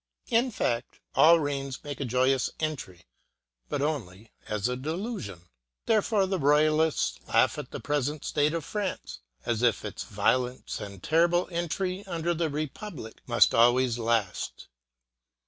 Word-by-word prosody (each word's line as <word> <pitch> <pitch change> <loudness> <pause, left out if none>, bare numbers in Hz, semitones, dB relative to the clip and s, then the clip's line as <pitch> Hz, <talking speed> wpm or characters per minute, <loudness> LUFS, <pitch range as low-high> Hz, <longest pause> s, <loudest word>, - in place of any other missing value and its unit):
In 240 +3 +3
fact, 120 - -2
all 165 +1 +7
reigns 140 -3 -3
make 145 -1 -6
a 140 - -2
joyous 130 +2 +2
entry, 125 - -4 0.6
but 140 - -1
only 110 - -4 0.2
as 105 +1 -1
a 125 - -1
delusion. 155 - -5 0.4
There 220 -2 +4
fore 200 -2 +1
the 190 -1 -1
Royalists 155 +2 +3
laugh - - +3
at - - -7
the - - -6
present 145 0 -2
state 150 +2 +1
of 165 - -3
France 190 - -4 0.3
as 115 -1 0
if 120 -4 +2
its - - -5
violent 125 0 -1
and 100 -2 -8
terrible 170 +2 +3
entry 180 +3 -2
under 170 -1 -1
the 165 -1 -1
republic 150 - -6
must 120 -1 +4
always 120 +1 +4
last. 115 -5 -1
145 Hz, 145 wpm, -28 LUFS, 120-170 Hz, 0.6 s, all